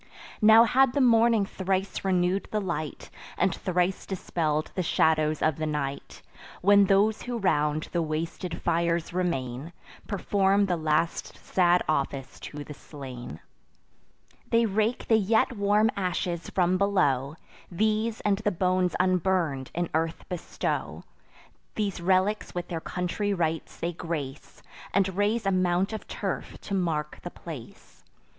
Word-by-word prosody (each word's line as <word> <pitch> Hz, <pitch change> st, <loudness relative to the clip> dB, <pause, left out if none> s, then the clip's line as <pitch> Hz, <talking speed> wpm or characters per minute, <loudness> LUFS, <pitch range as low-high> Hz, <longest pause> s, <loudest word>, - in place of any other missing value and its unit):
Now 220 Hz, +1 st, +8 dB
had 255 Hz, +2 st, +3 dB
the -, -, +1 dB
morning 230 Hz, -4 st, +4 dB
thrice 190 Hz, 0 st, -2 dB
renew'd 185 Hz, 0 st, +1 dB
the 215 Hz, -, 0 dB
light, 165 Hz, -6 st, -4 dB, 0.3 s
And -, -, +2 dB
thrice 180 Hz, +1 st, -1 dB
dispell'd 155 Hz, -5 st, -1 dB
the 185 Hz, -, -1 dB
shadows 155 Hz, -2 st, +2 dB
of 155 Hz, -3 st, +2 dB
the 155 Hz, 0 st, -2 dB
night, 140 Hz, -2 st, -4 dB, 0.4 s
When 200 Hz, +1 st, +6 dB
those 205 Hz, +3 st, +3 dB
who 245 Hz, -1 st, -4 dB
round 150 Hz, -6 st, +1 dB
the 170 Hz, -, 0 dB
wasted 165 Hz, +2 st, -4 dB
fires 170 Hz, 0 st, 0 dB
remain, 160 Hz, -4 st, -2 dB, 0.3 s
Perform 200 Hz, 0 st, +2 dB
the 180 Hz, -2 st, 0 dB
last 160 Hz, +1 st, -1 dB
sad 180 Hz, -1 st, +2 dB
office 135 Hz, -3 st, -2 dB
to 145 Hz, 0 st, -7 dB
the 150 Hz, -, -9 dB
slain. 130 Hz, -, -9 dB, 1.1 s
They 230 Hz, 0 st, +4 dB
rake 220 Hz, +3 st, 0 dB
the 225 Hz, -, +5 dB
yet 220 Hz, +4 st, +2 dB
warm 210 Hz, +2 st, +3 dB
ashes 180 Hz, -2 st, -2 dB
from 185 Hz, 0 st, +1 dB
below; 145 Hz, -9 st, +1 dB, 0.3 s
These, 215 Hz, +4 st, 0 dB
and 200 Hz, -1 st, +1 dB
the 210 Hz, -, +1 dB
bones 185 Hz, 0 st, +1 dB
unburn'd, 180 Hz, -7 st, +1 dB
in 175 Hz, 0 st, 0 dB
earth 160 Hz, +1 st, -1 dB
bestow; 180 Hz, -2 st, -3 dB, 0.7 s
These 200 Hz, -4 st, -2 dB
relics 190 Hz, +4 st, +1 dB
with 175 Hz, 0 st, -4 dB
their 165 Hz, -2 st, -3 dB
country 190 Hz, +4 st, -2 dB
rites 165 Hz, -2 st, -2 dB
they 170 Hz, +1 st, -2 dB
grace, 150 Hz, -5 st, -6 dB, 0.3 s
And 190 Hz, -2 st, +2 dB
raise 205 Hz, +2 st, +1 dB
a 195 Hz, -, +2 dB
mount 185 Hz, +2 st, +1 dB
of 220 Hz, -, -6 dB
turf -, -, -4 dB
to 200 Hz, -, -6 dB
mark 160 Hz, -5 st, -1 dB
the 175 Hz, -, -6 dB
place. 150 Hz, -10 st, -11 dB
180 Hz, 140 wpm, -27 LUFS, 160-200 Hz, 1.1 s, Now